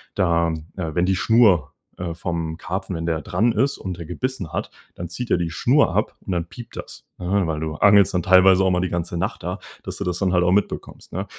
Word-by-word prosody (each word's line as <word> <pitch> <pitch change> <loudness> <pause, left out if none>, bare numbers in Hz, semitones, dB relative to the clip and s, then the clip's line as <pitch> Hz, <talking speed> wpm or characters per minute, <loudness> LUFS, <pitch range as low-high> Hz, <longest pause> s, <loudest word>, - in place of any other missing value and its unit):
da 85 -2 +2 0.3
äh, 80 -4 -3
wenn 90 +1 +2
die 95 - +2
Schnur, 95 -8 +4 0.3
äh, 90 -2 -4
vom 80 -1 -3
Karpfen 95 +1 -4
wenn 80 0 -4
der 80 -2 0
dran 115 +1 +1
ist 135 +6 +1
und 90 -2 -5
der 85 - -7
gebissen 100 -1 -4
hat, - - -3 0.3
dann 85 -1 -6
zieht 120 +8 -6
er - - +4
die 85 -2 -1
Schnur 125 - +2
ab. - - 0
Und - - -6
dann 85 -1 -2
piept 120 -2 -11
das, - - -9
ne, 95 +1 0
weil 80 -1 -2
du 80 -1 -3
angelst 100 +3 +5
dann 90 - +1
teilweise 95 0 +6
auch 95 - +3
mal 90 - +2
die 90 - -1
ganze 85 0 -3
Nacht - - -2
da, - - -3 0.3
dass - - -6
du - - -3
das 90 0 -2
dann 95 -2 +1
halt 90 0 +3
auch 90 - +3
mitbekommst, 100 +1 -2
ne? 95 +3 -3
90 Hz, 240 wpm, -22 LUFS, 85-95 Hz, 0.3 s, teilweise